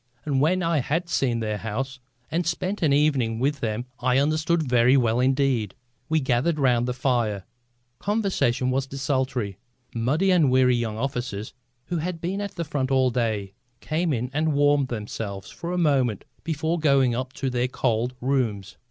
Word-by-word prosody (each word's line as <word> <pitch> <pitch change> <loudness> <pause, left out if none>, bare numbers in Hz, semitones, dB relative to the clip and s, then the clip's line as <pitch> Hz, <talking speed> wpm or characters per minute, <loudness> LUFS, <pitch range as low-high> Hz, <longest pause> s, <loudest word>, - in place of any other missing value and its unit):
And 140 -3 +1
when 180 +5 +2
I 165 -2 +2
had 165 +7 -1
seen 125 -7 +1
their 105 -1 -2
house 130 +5 -4 0.3
and 170 +2 0
spent 185 +4 -2
an 155 -4 +3
evening 140 -6 +2
with 140 +4 0
them 115 0 -2
I 125 +1 +2
understood 155 +3 +2
very 125 +2 +5
well 120 -2 +2
indeed. 130 -5 +1 0.3
We 160 0 +3
gathered 135 +4 +1
round 125 -4 +2
the 125 - -1
fire; 120 -6 0 0.6
conversation 195 - 0
was 135 +1 0
desultory. 130 -7 -2 0.3
Muddy 145 +12 +1
and 165 -7 +4
weary 125 -1 +4
young 115 -3 -2
officers, 120 -5 -3 0.3
who 175 - -2
had 165 +1 -3
been 185 +5 -2
at 200 -1 -5
the 170 -2 -3
front 140 -3 -2
all 130 -1 +3
day, 110 -5 -1 0.3
came 160 +2 -1
in 125 -1 -2
and 155 +1 +1
warmed 145 -1 +3
themselves 105 -4 -5
for 170 - -6
a 180 - -1
moment 135 - +1 0.2
before 160 +1 -1
going 140 -5 +3
up 130 +2 -3
to 135 - -2
their 125 0 +1
cold 125 -1 -1
rooms. 110 -6 -1
130 Hz, 170 wpm, -25 LUFS, 120-155 Hz, 0.6 s, very